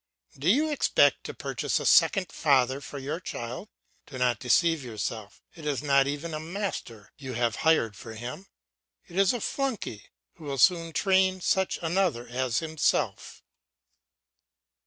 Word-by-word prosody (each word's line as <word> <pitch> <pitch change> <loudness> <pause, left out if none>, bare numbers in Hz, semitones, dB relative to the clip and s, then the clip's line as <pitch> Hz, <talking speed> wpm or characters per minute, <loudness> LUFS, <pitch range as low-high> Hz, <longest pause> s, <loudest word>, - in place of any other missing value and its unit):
do 145 +6 -1
you 300 +9 +3
expect 290 - +3
to - - -5
purchase - - -2
a - - -5
second 190 -4 +4
father 135 -2 +2
for 145 - -8
your 145 +5 -4
child? 125 - -6 0.4
Do 135 - -8
not 125 -3 +1
deceive 165 +4 +2
yourself; 110 -2 -6
it 165 - -13
is 145 -2 -2
not 140 -1 +4
even 145 +3 -4
a 155 - -3
master 160 - -5
you 130 -2 -6
have 120 -1 0
hired 155 -10 +2
for 110 +2 -10
him, 125 - -7 0.6
it - - -14
is 195 0 +4
a 245 - -2
flunkey, 225 - -3 0.3
who 160 - -12
will 140 -1 -3
soon 170 0 +3
train 190 +1 +2
such 190 +1 +1
another 165 -8 0
as 125 -1 -1
himself. 160 -1 -1
150 Hz, 155 wpm, -27 LUFS, 125-185 Hz, 0.6 s, second